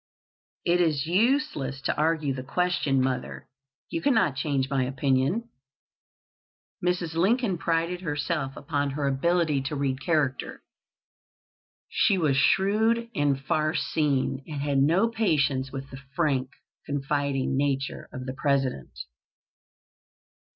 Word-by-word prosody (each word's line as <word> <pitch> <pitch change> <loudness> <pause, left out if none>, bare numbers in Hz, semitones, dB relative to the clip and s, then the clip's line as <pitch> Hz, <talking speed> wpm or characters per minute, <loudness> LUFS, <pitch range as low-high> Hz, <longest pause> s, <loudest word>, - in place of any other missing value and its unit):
"It 175 +1 +3
is 155 -4 +1
useless 195 - +1
to - - -1
argue 155 -2 +1
the 130 - -5
question, 140 -2 +1
mother. 130 -1 -3 0.4
You 330 - -2
cannot 225 - +2
change 135 -1 0
my 135 -1 0
opinion." 135 - 0 1.3
Mrs. 180 -2 0
Lincoln 195 +2 +1
prided 170 +2 0
herself 150 -3 -2
upon 145 0 -1
her 140 +1 -2
ability 155 +1 +1
to 140 +3 -3
read 135 -1 -1
character. 150 -6 -1 1.2
She 195 - +2
was 155 -6 +2
shrewd 220 - +2
and 145 -7 +1
far 155 +3 0
seeing, 140 -4 0
and 150 -3 -4
had 140 -2 +1
no 170 +11 +4
patience 145 - +1
with 135 0 -7
the 135 +1 -9
frank, 135 -6 +1 0.4
confiding 140 -1 -1
nature 135 -1 -1
of 130 0 -7
the 130 - -4
President. 135 - -1
145 Hz, 120 wpm, -26 LUFS, 135-175 Hz, 1.3 s, no